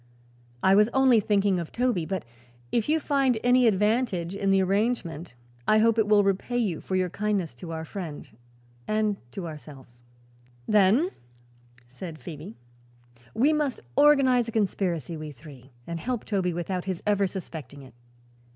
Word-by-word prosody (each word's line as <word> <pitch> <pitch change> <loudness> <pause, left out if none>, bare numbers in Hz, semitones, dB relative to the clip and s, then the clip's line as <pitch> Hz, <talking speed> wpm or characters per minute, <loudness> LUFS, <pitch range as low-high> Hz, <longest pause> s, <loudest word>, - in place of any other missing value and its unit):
"I 190 - +5
was 210 +2 +5
only 260 -3 +5
thinking 200 -2 +1
of 170 - -6
Toby; 240 -10 0
but 190 -3 -3 0.5
if 235 +4 0
you 320 +1 +3
find 275 -5 +1
any 245 0 +5
advantage 210 -4 +1
in 195 0 -1
the 195 0 +4
arrangement 190 - -1 0.3
I 215 - +5
hope 230 +1 +3
it 215 - +2
will 210 -1 +5
repay 200 +5 -1
you 200 -10 -1
for 190 - -3
your 185 -2 0
kindness 200 -7 -1
to 165 +7 -8
our 160 0 -5
friend 165 -4 -7 0.6
and 215 -1 0
to 190 - -6
ourselves." 135 -6 -12 0.7
[Illustration: 205 -1 +5
"Then," 370 - -5 0.8
said 155 +6 -8
Phoebe, 165 +6 -9 0.8
"we 285 +6 +3
must 300 -4 -1 0.2
organize 265 -5 +5
a - - -4
conspiracy, 185 - -1
we 155 -1 -7
three, 135 -2 -13 0.2
and 170 0 -5
help 245 +4 -3
Toby 190 -4 0
without 175 +2 -3
his 185 -3 -4
ever 205 -1 +2
suspecting 160 -6 -8
it." 130 - -15
195 Hz, 160 wpm, -26 LUFS, 170-225 Hz, 0.8 s, I